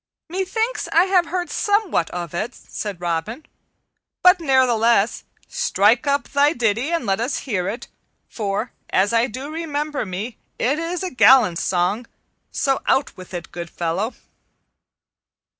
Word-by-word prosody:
"Methinks 385 +7 -2
I 340 - +5
have 370 -2 +2
heard 355 0 -3
somewhat 410 - +1
of 175 -2 -5
it," 215 +8 -3
said 205 -4 -6
Robin; 175 - -3 0.8
"but 360 0 +7
ne'ertheless 240 -7 +2 0.2
strike 225 +8 +2
up 280 0 +1
thy 285 +2 +3
ditty 235 +2 0
and 335 -7 -1
let 195 -1 0
us 245 +5 -1
hear 190 -8 -1
it, 235 +4 -6 0.4
for, 210 +2 -3 0.2
as 200 +4 +2
I 230 +2 +3
do 265 +6 -7
remember 300 -2 -3
me, 205 +4 -6 0.2
it 280 +6 +1
is 340 +2 -3
a 370 - -3
gallant 245 -8 +5
song; 190 +6 0 0.4
so 270 -1 0
out 270 +1 +1
with 185 -1 -12
it, 175 -2 -7
good 175 -1 -6
fellow." 175 +8 -2
240 Hz, 140 wpm, -21 LUFS, 195-305 Hz, 0.8 s, but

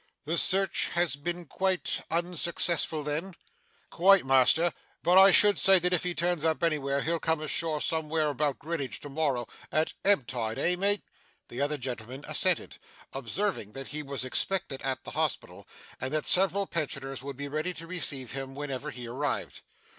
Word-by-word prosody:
'The 160 +3 -1
search 195 +2 +3
has 170 -3 +2
been 175 +4 -5
quite 190 +4 -1
unsuccessful 170 -2 0
then?' 160 +5 -3 0.6
'Quite, 195 -1 +5
master. 135 +6 +4 0.3
But 180 +2 +6
I 195 +1 +9
should 205 0 +6
say 195 -1 +7
that 180 0 +1
if 180 - +3
he 180 -1 -2
turns 175 -2 0
up 160 +1 0
anywhere, 140 -4 0
he'll 165 +1 0
come 160 0 0
ashore 155 0 0
somewhere 160 -1 0
about 145 0 -1
Grinidge 155 -4 -4
to 145 - -8
morrow, 140 -4 -1 0.3
at 155 +1 0
ebb 195 -10 +4
tide, 115 -2 -4
eh, 180 - +1
mate?' 200 +3 +1 0.5
The 120 - -5
other 145 +1 0
gentleman 125 +1 -6
assented, - - +1 0.3
observing 135 - -3
that 135 0 -6
he 150 +1 -4
was 140 -2 -4
expected 160 +1 -1
at 135 -1 -3
the - - -8
Hospital, - - -3 0.3
and 130 +1 -3
that 155 - -1
several 195 +2 +4
pensioners 135 -6 -4
would 140 -1 -7
be 140 0 -5
ready 155 +5 -2
to 165 +3 -9
receive 150 -8 -3
him 135 0 -6
whenever 140 -3 -5
he 120 -1 -8
arrived. 140 +5 -3
155 Hz, 170 wpm, -28 LUFS, 135-175 Hz, 0.6 s, I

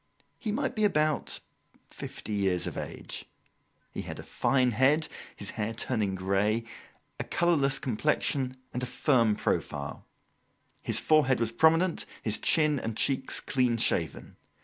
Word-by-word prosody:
He 215 - -2
might 235 +3 -1
be 215 - 0
about 155 -7 +1 0.5
fifty 105 - -7
years 95 -3 +1
of - - -4
age. - - -6 0.7
He - - -4
had - - -7
a - - -8
fine 130 -2 +1
head, 140 +7 +3 0.3
his 100 - -5
hair 110 +1 -3
turning 110 -5 -1
grey; 100 +4 +1 0.6
a - - -1
colourless 145 -6 +2
complexion, 130 +1 0 0.2
and 125 - -2
a 125 - -2
firm 120 -3 +2
profile. - - -2 0.7
His - - +2
forehead 150 -5 +3
was 115 -1 +1
prominent, 165 +7 +3 0.2
his 110 -1 +1
chin 150 -3 +3
and 115 -2 -4
cheeks 135 -1 +1
clean 125 -3 +1
shaven. 80 -9 0
130 Hz, 140 wpm, -29 LUFS, 110-150 Hz, 0.7 s, head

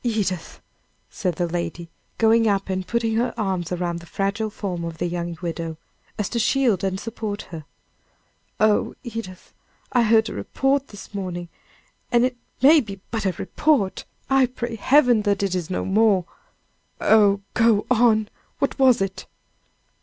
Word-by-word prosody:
Edith!" 205 -7 -2 0.5
said 180 -4 -2
the 175 - 0
lady, 170 0 -4 0.3
going 225 0 +4
up 195 -1 0
and 185 -1 -3
putting 230 -1 0
her 240 +2 0
arms 190 -5 -2
around 175 -1 -2
the 170 - -14
fragile 200 +4 -1
form 185 -5 -4
of 165 -1 -5
the 175 - -2
young 175 -1 -3
widow, 165 -1 -4 0.4
as 210 -3 -1
to 235 - -2
shield 235 -5 +2
and 190 0 -1
support 215 -2 -5
her. 160 -3 -7 0.9
"Oh, 215 -1 +2
Edith! 225 -7 -8 0.4
I 245 - +4
heard 225 0 +4
a - - -5
report 270 0 0
this 205 0 -12
morning 180 -3 -5 0.6
and 240 0 +4
it 255 0 -2 0.3
may 305 +4 +8
be 200 -5 -8
but 220 -3 -1
a 185 - 0
report 260 -4 0 0.2
I 270 -1 +4
pray 240 -2 -5
Heaven, 250 -1 +4
that 200 -1 0
it 195 -2 0
is 180 -2 -2
no 185 - -2
more 200 -2 +3 0.4
" - - -43
"Oh, 205 -2 +4
go 225 -3 +3
on! 220 -3 +4 0.3
what 275 - -1
was 255 -6 +5
it?" 190 -1 -6
205 Hz, 160 wpm, -23 LUFS, 185-230 Hz, 0.9 s, may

